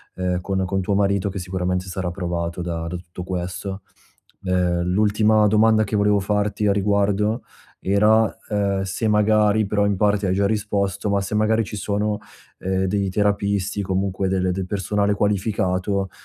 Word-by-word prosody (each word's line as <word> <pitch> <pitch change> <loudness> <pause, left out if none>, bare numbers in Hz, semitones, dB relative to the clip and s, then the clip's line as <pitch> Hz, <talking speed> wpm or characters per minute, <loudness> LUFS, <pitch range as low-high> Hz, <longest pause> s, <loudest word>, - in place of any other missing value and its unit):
ehm, 90 -1 -1
con 95 0 -1
con 95 +1 -1
tuo 100 +2 -1
marito 100 0 +1
che 95 - -5
sicuramente 90 0 -2
sarà 90 -1 -3
provato 85 -1 -3
da 85 -1 -3
da 90 - -4
tutto 90 0 -9
questo. 95 +2 -5 0.6
E 90 -1 +1
l'ultima 105 +3 +3
domanda 110 +1 +4
che 105 - -3
volevo 105 0 +3
farti 105 +1 0
a 100 - +4
riguardo 100 +2 +1 0.4
era, 105 +3 +4 0.3
uhm, 100 -2 0
se 95 +4 -2
magari- 105 0 +3
però 100 0 +1
in 100 - +1
parte 105 -1 +2
hai 90 - +1
già 100 +1 +1
risposto- 100 -2 -1
ma 100 - +2
se 100 +2 -3
magari 110 +1 +2
ci 105 - -7
sono, 105 +1 -1 0.4
ehm, 95 0 -1
dei 100 0 0
terapisti, 100 0 0
comunque 95 0 -1
del 95 -1 +1
del 95 +1 -3
personale 100 +2 0
qualificato, 100 -1 0
100 Hz, 165 wpm, -22 LUFS, 95-105 Hz, 0.6 s, domanda